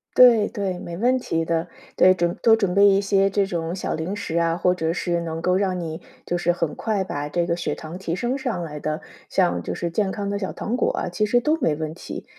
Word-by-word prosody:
对 235 -4 +7
对， 190 -3 -3
没 170 - -7
问 250 +5 +2
题 165 -9 -1
的。 165 +1 -1 0.3
对， 185 - +7
准 175 -1 -1
多 225 -1 +6
准 195 -5 0
备 200 +1 +6
一 195 0 +4
些 195 0 +2
这 195 0 +1
种 170 -2 -3
小 190 - -3
零 165 +5 -3
食 170 -5 -3
啊， 165 0 +2
或 180 +1 +2
者 165 -2 -1
是 175 -1 -1
能 165 -1 -4
够 180 +2 +2
让 190 -2 0
你 165 -2 -5 0.2
就 175 - -1
是 175 0 +1
很 165 -3 -2
快 210 -4 -1
把 145 -6 -4
这 170 +3 0
个 170 0 -1
血 170 - -2
糖 160 +3 -8
提 170 -3 -3
升 240 +8 -1
上 240 -10 -3
来 150 -2 -6
的， 155 +1 -3 0.3
像 85 0 +1
就 - - -4
是 170 - -2
健 190 +3 0
康 200 -1 -3
的 200 0 -2
小 190 - -3
糖 235 +4 -3
果 - - +2
啊， - - -2
其 210 +5 0
实 245 +3 +2
都 305 +5 +2
没 160 - +1
问 155 0 -4
题。 175 - -8
180 Hz, 270 characters per minute, -23 LUFS, 165-200 Hz, 0.3 s, 对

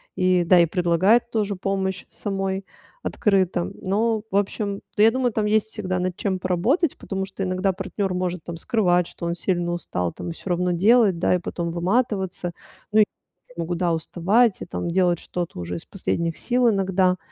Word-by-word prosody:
и 185 -1 +3
да, 175 +1 +5
и 170 - +6
предлагать 180 +7 +3
тоже 210 -3 0
помощь 190 0 -2
самой 195 -1 -3 0.4
открыто, 185 - +1
но 215 +3 0
в - - -3
общем 200 0 -1 0.2
да, 210 - +5
я 225 - +7
думаю, 250 0 0
там 215 -1 0
есть 215 0 +2
всегда 185 -4 -3
над 180 -1 -2
чем 190 -2 -1
поработать, 215 - +1
потому 195 -1 -4
что 195 0 -5
иногда 185 +1 0
партнер 195 +1 -3
может 180 -2 -2
там 170 -1 -6
скрывать, 180 -2 +2
что - - -8
он 170 0 -1
сильно 175 -1 -1
устал, 90 - -2
там 170 - -6
всё 165 - -8
равно 180 0 +1
делать, 200 +2 +4
да, 180 - +3
и - - 0
потом 170 0 -4
выматываться, 190 0 0 0.4
ну, 215 - +4
и - - +6 0.5
могу, 170 +1 -2
да, 170 -1 +1
уставать 190 +7 +2
и - - -7
там 175 - -4
делать 175 -1 +2
что-то 175 - -5
уже 85 0 -4
из 85 - -7
последних 170 -4 -2
сил 245 -1 +2
иногда. 190 -2 +2
185 Hz, 185 wpm, -23 LUFS, 175-205 Hz, 0.5 s, я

